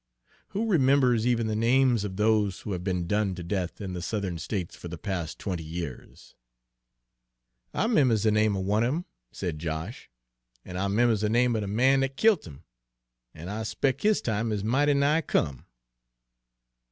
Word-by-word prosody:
Who 210 +4 -2
remembers 130 - +3
even 120 -2 +2
the 110 -1 -1
names 120 0 +3
of 100 -2 -4
those 105 -2 +1
who 105 - -6
have 90 -2 -3
been 90 -2 -1
done 105 0 0
to 90 - -7
death 90 0 -3
in 95 -3 -5
the 90 - -4
Southern 95 -2 -3
States 90 -1 -4
for - - -9
the 85 0 -7
past 85 -2 -4
twenty 90 -5 -4
years?" 80 -4 -8 1.4
"I - - 0
'members 130 - +3
de 110 - +3
name 105 -1 +2
er - - -2
one 105 +4 +1
of - - +2
'em," 175 +2 -4 0.3
said 80 -4 -4
Josh, 80 - -5 0.6
"an' 90 - -8
I 95 +2 0
'members 110 +1 +2
de 105 - +1
name 120 +1 +3
er - - 0
de 105 - -3
man 130 +7 +3
dat 135 0 -2
killt 215 - +3
'im, 70 -4 -12 0.7
an' 80 +2 -8
I 105 +3 -4
s'pec' 130 +4 -1
his 215 0 +3
time 110 0 -1
is 105 -2 -2
mighty 140 +6 +2
nigh 145 +3 +3
come." 70 - -1
105 Hz, 185 wpm, -27 LUFS, 90-125 Hz, 1.4 s, remembers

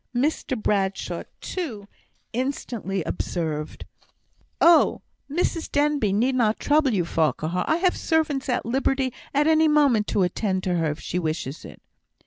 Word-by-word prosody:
Mr 260 -1 0
Bradshaw, 195 -2 -1 0.2
too, 235 - -5 0.5
instantly 235 - -3
observed: 155 -3 -4 0.7
"Oh! 335 -1 +5 0.3
Mrs 330 +2 -1
Denbigh 290 -7 +2
need 235 +7 +2
not 230 -4 +1
trouble 295 -2 +3
you, 185 -6 +1
Farquhar. 165 +2 0
I 315 - +3
have 360 +1 +2
servants 305 -5 0
at 245 - 0
liberty 265 +1 0 0.2
at 290 +1 +2
any 315 0 +4
moment 280 -8 +3
to 195 - +1
attend 185 +1 -1
on 180 -1 +1
her, 165 -2 +1
if 150 +1 -4
she 180 - -3
wishes 155 -3 -3
it." - - -12
235 Hz, 140 wpm, -24 LUFS, 185-295 Hz, 0.7 s, Oh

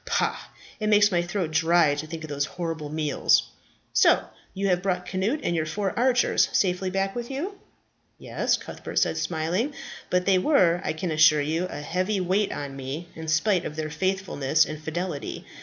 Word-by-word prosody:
Pah! - - 0 0.4
it 215 - -1
makes 210 0 +5
my 175 -2 +2
throat 175 -1 -3
dry 165 -1 +4
to 145 +2 -4
think 160 0 -7
of 155 - -7
those 145 0 0
horrible 165 -4 -3
meals. 150 -2 +2 0.5
So - - +5 0.3
you 195 +1 -1
have 180 -1 +2
brought 180 -2 -1
Cnut 200 +12 -1
and 170 - 0
your 160 -1 -1
four 195 +4 -2
archers 250 0 +3
safely 185 0 +1
back 195 +1 -1
with 240 -1 -4
you?" 345 +9 -4 0.6
"Yes," - - 0
Cuthbert - - -9
said, - - +2
smiling, 180 - -1 0.3
"But 180 0 +1
they 190 -2 +4
were, 180 - +3
I - - -1
can 165 +2 -3
assure 155 -1 +5
you, 160 +5 -1
a 145 - -6
heavy 185 +6 -1
weight 190 +3 +1
on 140 -1 -5
me, 135 +6 -6
in 160 0 -7
spite 170 +4 +2
of 150 - -6
their 155 -1 -4
faithfulness 160 -4 +1
and 155 0 -7
fidelity. 160 -1 -4
175 Hz, 185 wpm, -25 LUFS, 155-195 Hz, 0.6 s, makes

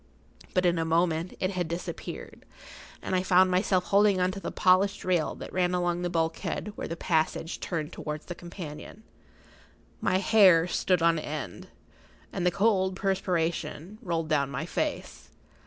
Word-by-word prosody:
But 185 0 +3
in 175 -1 +2
a - - +1
moment 165 +1 0
it 185 0 0
had 180 -3 -2
disappeared, 170 +2 -6 0.6
and 185 - -1
I 180 - +2
found 185 0 +4
myself 185 0 +2
holding[Pg 200 0 +5
45] 180 - +2
on 180 - +1
to 195 - -6
the - - -5
polished 195 +2 +3
rail 180 -4 +1
that - - -9
ran 180 -1 +1
along 175 -1 0
the 175 - -1
bulkhead 165 +5 -2
where - - -5
the 165 - -4
passage 160 0 -1
turned 165 -2 -4
towards 150 0 -5
the 175 - -5
companion. 175 +3 -9 1.0
My 185 - +1
hair 190 -4 +6
stood 180 -1 +1
on 165 -1 +4
end, 150 -12 -6 0.7
and 180 - 0
the - - +6
cold 190 -1 +2
perspiration 185 -1 -2
rolled 165 -6 -2
down 140 -3 +1
my 140 - -4
face. - - -4
180 Hz, 165 wpm, -28 LUFS, 165-185 Hz, 1.0 s, hair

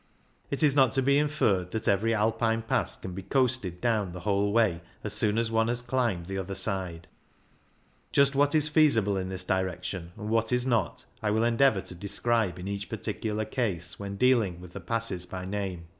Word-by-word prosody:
It 140 - -1
is 145 -2 +4
not 135 -4 +4
to 135 0 +2
be 140 +2 +4
inferred 115 -12 +1
that 110 +3 -4
eyery 105 +4 +2
Alpine 115 +1 +1
pass 115 - 0
can 90 - -8
be 95 - -6
coasted 125 -6 0
down 105 -6 0
the 90 - -8
whole 100 0 +1
way 105 -7 +2 0.2
as 105 - -3
soon 105 0 +2
as 115 -1 +1
one 115 0 +2
has 120 +1 -1
climbed 120 -9 -1
the 95 +1 -4
other 95 +1 -5
side; 90 -6 -2 1.0
just 140 0 +4
what 145 +2 +2
is 155 -1 +5
feasible 140 -10 +3
in 95 -1 -3
this 95 -1 -2
direction 95 -2 -3
and 105 - -6
what 115 +1 +1
is 125 0 +2
not 115 -8 -1 0.2
I 110 - 0
will 110 +2 +2
endeavour 120 -2 +3
to - - -8
describe 100 +1 -1
in 90 +1 -7
each 100 +1 -4
particular 110 0 -3
case 95 -10 -3
when 100 -1 -5
dealing 110 -6 +2
with 90 -1 -12
the - - -6
passes 115 -6 -2
by 90 0 -6
name. 95 -3 -4
105 Hz, 200 wpm, -28 LUFS, 95-120 Hz, 1.0 s, is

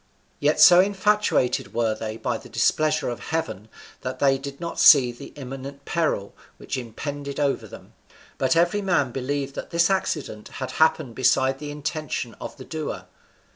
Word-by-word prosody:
Yet 150 +2 +2
so 175 +3 +9
infatuated 200 - +1
were 115 -2 +1
they 110 0 -5
by - - -2
the - - -14
displeasure 155 0 +1
of 120 - -5
Heaven 110 - -4 0.3
that 130 0 -4
they 135 0 +3
did 140 0 -8
not 170 0 -5
see 135 -6 +8
the 120 - -10
imminent 135 0 -8
peril 155 -12 -1 0.2
which - - -5
impended 140 +4 -5
over 140 -2 0
them, - - -13 0.5
but 130 +4 +2
every 175 +5 +2
man 175 -10 +1
believed 135 +2 -3
that - - -7
this 170 +3 +2
accident 150 - -2
had 130 -1 -4
happened 155 -5 +3
beside 130 +2 +2
the 150 - -6
intention 150 -4 -4
of - - -7
the 130 - -10
doer. 160 -2 -5
140 Hz, 165 wpm, -24 LUFS, 130-160 Hz, 0.5 s, so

